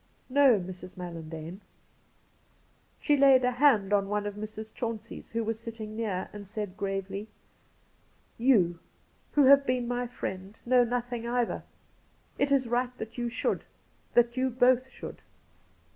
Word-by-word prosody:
' -, -, -38 dB
No, 260 Hz, -7 st, +7 dB
Mrs. 185 Hz, 0 st, -9 dB
Mallandane.' 165 Hz, 0 st, -7 dB, 1.4 s
She 295 Hz, -, +3 dB
laid 270 Hz, -2 st, +6 dB
a 250 Hz, -, +3 dB
hand 245 Hz, -7 st, +3 dB
on 200 Hz, -1 st, +2 dB
one 210 Hz, 0 st, -1 dB
of 205 Hz, -, -3 dB
Mrs. 215 Hz, +1 st, -7 dB
Chauncey's, 230 Hz, -3 st, -5 dB
who 230 Hz, 0 st, -2 dB
was 225 Hz, 0 st, -2 dB
sitting 225 Hz, -2 st, -7 dB
near, 210 Hz, -5 st, -2 dB
and 205 Hz, -1 st, -9 dB
said 205 Hz, -2 st, -5 dB
gravely: 195 Hz, 0 st, -3 dB, 0.6 s
' -, -, -37 dB
You, 175 Hz, -10 st, +4 dB, 0.5 s
who 290 Hz, -, +5 dB
have 280 Hz, +1 st, +7 dB
been 250 Hz, -2 st, 0 dB
my 245 Hz, 0 st, -1 dB
friend, 195 Hz, -4 st, -6 dB
know 250 Hz, 0 st, +5 dB
nothing 240 Hz, 0 st, -2 dB
either. 240 Hz, -1 st, 0 dB, 0.8 s
It 280 Hz, 0 st, +2 dB
is 270 Hz, -3 st, +3 dB
right 245 Hz, +1 st, -1 dB
that 225 Hz, +2 st, -7 dB
you 240 Hz, 0 st, -1 dB
should -, -, -1 dB, 0.2 s
— -, -, -37 dB
that 240 Hz, 0 st, +4 dB
you 260 Hz, 0 st, +1 dB
both 255 Hz, +1 st, +3 dB
should.' -, -, -9 dB
230 Hz, 155 wpm, -29 LUFS, 200-250 Hz, 1.4 s, No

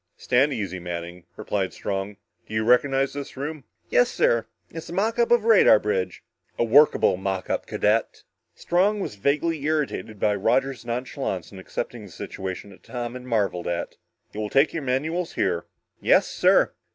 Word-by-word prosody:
"Stand 130 Hz, +4 st, +2 dB
easy, 100 Hz, -7 st, -3 dB
Manning," 85 Hz, 0 st, -6 dB
replied 100 Hz, -3 st, -2 dB
Strong. 100 Hz, 0 st, -4 dB, 0.3 s
"Do 110 Hz, -, -6 dB
you 110 Hz, -, +1 dB
recognize 135 Hz, +3 st, +3 dB
this 140 Hz, -1 st, -7 dB
room?" 145 Hz, 0 st, -5 dB, 0.3 s
"Yes, 120 Hz, -, +4 dB
sir. 115 Hz, -1 st, +1 dB, 0.2 s
It's 165 Hz, 0 st, -8 dB
a -, -, -6 dB
mock 220 Hz, +6 st, 0 dB
up 235 Hz, -, +3 dB
of 240 Hz, -2 st, +4 dB
a -, -, -1 dB
radar 215 Hz, -, +7 dB
bridge." 95 Hz, -4 st, -2 dB, 0.3 s
"A -, -, +2 dB
workable 135 Hz, -4 st, +5 dB
mock 95 Hz, -1 st, -3 dB
up, -, -, -2 dB
cadet!" 110 Hz, +2 st, 0 dB, 0.3 s
Strong 195 Hz, +4 st, +1 dB
was -, -, -4 dB
vaguely 140 Hz, +8 st, 0 dB
irritated 150 Hz, -8 st, -2 dB
by 105 Hz, -, +2 dB
Roger's 125 Hz, +5 st, 0 dB
nonchalance 120 Hz, -, -3 dB
in 95 Hz, -, -10 dB
accepting 115 Hz, +3 st, -5 dB
a -, -, -12 dB
situation 95 Hz, +3 st, -6 dB
that 95 Hz, -, -16 dB
Tom 120 Hz, -1 st, -5 dB
had 125 Hz, -, -7 dB
marveled 100 Hz, -7 st, -1 dB
at. 85 Hz, 0 st, -3 dB, 0.4 s
"You 105 Hz, -, -6 dB
will 105 Hz, -1 st, -2 dB
take 135 Hz, +6 st, +3 dB
your 165 Hz, -, -2 dB
manuals 155 Hz, +7 st, -1 dB
here!" 85 Hz, -2 st, -1 dB, 0.3 s
"Yes, -, -, +4 dB
sir." -, -, +3 dB
120 Hz, 175 wpm, -24 LUFS, 100-145 Hz, 0.4 s, radar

